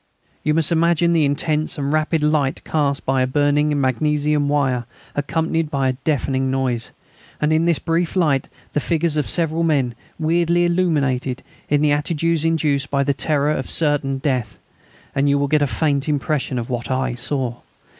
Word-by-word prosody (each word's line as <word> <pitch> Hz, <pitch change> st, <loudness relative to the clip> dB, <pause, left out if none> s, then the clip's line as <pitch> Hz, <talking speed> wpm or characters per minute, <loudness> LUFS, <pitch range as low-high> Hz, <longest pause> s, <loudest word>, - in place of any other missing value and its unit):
You 155 Hz, 0 st, +1 dB
must 160 Hz, -1 st, +3 dB
imagine 170 Hz, 0 st, +3 dB
the 160 Hz, -3 st, +3 dB
intense 150 Hz, +2 st, 0 dB
and 140 Hz, 0 st, -1 dB
rapid 155 Hz, 0 st, +1 dB
light 150 Hz, -3 st, +1 dB
cast 145 Hz, -3 st, -1 dB
by 135 Hz, 0 st, +1 dB
a 130 Hz, -, +2 dB
burning 145 Hz, +2 st, +1 dB
magnesium 145 Hz, +2 st, +1 dB
wire, 135 Hz, -4 st, +1 dB, 0.3 s
accompanied 160 Hz, +2 st, -1 dB
by 135 Hz, -3 st, 0 dB
a -, -, 0 dB
deafening 135 Hz, -1 st, -1 dB
noise, 130 Hz, -3 st, -1 dB, 0.5 s
and 150 Hz, +1 st, +1 dB
in 160 Hz, +1 st, +2 dB
this 170 Hz, -3 st, +2 dB
brief 165 Hz, +1 st, -1 dB
light 150 Hz, -7 st, +2 dB, 0.3 s
the -, -, +1 dB
figures 165 Hz, +1 st, 0 dB
of 150 Hz, -, -1 dB
several 165 Hz, -1 st, +1 dB
men, 140 Hz, -7 st, +1 dB, 0.2 s
weirdly 170 Hz, +2 st, +2 dB
illuminated, 140 Hz, -8 st, 0 dB, 0.3 s
in 145 Hz, 0 st, +2 dB
the 150 Hz, -, +3 dB
attitudes 160 Hz, +2 st, 0 dB
induced 150 Hz, -4 st, +1 dB
by 140 Hz, -1 st, +1 dB
the 140 Hz, 0 st, +1 dB
terror 150 Hz, +1 st, 0 dB
of 130 Hz, -, -2 dB
certain 145 Hz, -3 st, +1 dB
death, 125 Hz, -, -2 dB, 0.6 s
and 140 Hz, +1 st, +1 dB
you 140 Hz, -, +3 dB
will 140 Hz, 0 st, 0 dB
get 150 Hz, +1 st, +2 dB
a 145 Hz, -, +2 dB
faint 145 Hz, 0 st, 0 dB
impression 145 Hz, -2 st, -1 dB
of 120 Hz, -1 st, -3 dB
what 120 Hz, -2 st, -4 dB
I 130 Hz, -1 st, 0 dB
saw. 125 Hz, 0 st, -2 dB
145 Hz, 175 wpm, -20 LUFS, 135-160 Hz, 0.6 s, must